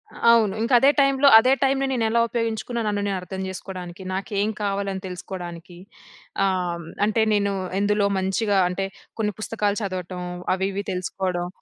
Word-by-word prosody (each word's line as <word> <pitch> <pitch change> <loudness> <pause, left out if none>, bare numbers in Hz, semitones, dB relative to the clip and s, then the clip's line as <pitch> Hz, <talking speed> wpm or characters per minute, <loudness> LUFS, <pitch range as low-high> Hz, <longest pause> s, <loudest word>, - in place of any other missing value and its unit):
అ - - -11
అవును. 220 -4 +4
ఇంకా 230 +3 0
అదే 270 - +6
టైమ్‌లో 275 0 +4
అదే 255 +4 +5
టైమ్‌లో 270 0 +2
నేను 245 -3 0
ఎలా 235 +1 +2
ఉపయోగించుకున్న 230 0 -2
నన్ను 205 -1 0
నేను 200 - -1
అర్థం 190 +1 -6
చేసుకోడానికి 185 -1 -7
నాకేం 200 +2 -1
కావాలి 200 -1 -1
అని 190 - -5
తెలుసుకోవడానికి. 175 -1 -8 0.7
ఆహ్, 180 -3 -1 0.2
అంటే 215 +1 +1
నేను 200 -1 +1 0.3
ఎందులో 205 0 +2
మంచిగా 195 +2 0
అంటే 195 +2 -2 0.3
కొన్ని 210 -1 0
పుస్తకాలు 210 -2 -1
చదవటం 185 -2 -4 0.3
అవి 190 +1 0
ఇవి 200 +1 -3
తెలుసుకోవడం. 180 -1 -2
200 Hz, 155 wpm, -23 LUFS, 185-220 Hz, 0.7 s, అదే